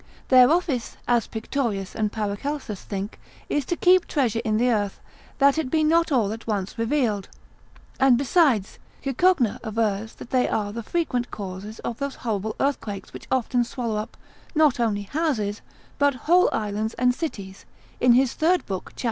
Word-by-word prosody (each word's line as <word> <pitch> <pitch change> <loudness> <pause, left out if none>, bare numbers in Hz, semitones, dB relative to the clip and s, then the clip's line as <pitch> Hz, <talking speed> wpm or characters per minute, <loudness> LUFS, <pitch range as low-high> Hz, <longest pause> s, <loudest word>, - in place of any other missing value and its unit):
Their 255 -1 +7
office, 315 -9 0
as 240 -3 +2
Pictorius 220 -4 -3
and 215 -1 0
Paracelsus 215 +2 -3
think, 200 +1 -5 0.3
is 295 -3 0
to 345 - -1
keep 365 +1 +4
treasure 240 -6 0
in 215 -2 +1
the 245 +2 +3
earth, 205 -3 -1 0.4
that 280 +2 +4
it 295 -5 -2
be 310 +3 +2
not 330 +1 +3
all 225 -7 +2
at 225 +1 -10
once 200 -3 -2
revealed; 230 -5 0 0.7
and 265 -2 +5
besides, 270 - +2 0.2
Cicogna 275 - +2
avers 220 -1 -1
that - - -11
they 255 -1 +2
are 205 -1 -1
the 230 - -4
frequent 250 -2 -1
causes 200 +2 -7
of 235 - -5
those 280 -1 -3
horrible 220 -1 -2
earthquakes 215 -8 -2
which - - -10
often 250 -1 +1
swallow 235 -2 -3
up, 215 +2 -5 0.4
not 300 -5 +4
only 210 -4 0
houses, 225 -6 -1 0.4
but 285 -1 +3
whole 355 +3 +5
islands 215 +1 -2
and 250 0 +3
cities; 200 - -6 0.3
in 245 -1 +5
his 255 0 +3
third 350 +3 +2
book, 190 -2 -5
cap. - - -15
235 Hz, 165 wpm, -24 LUFS, 210-280 Hz, 0.7 s, Their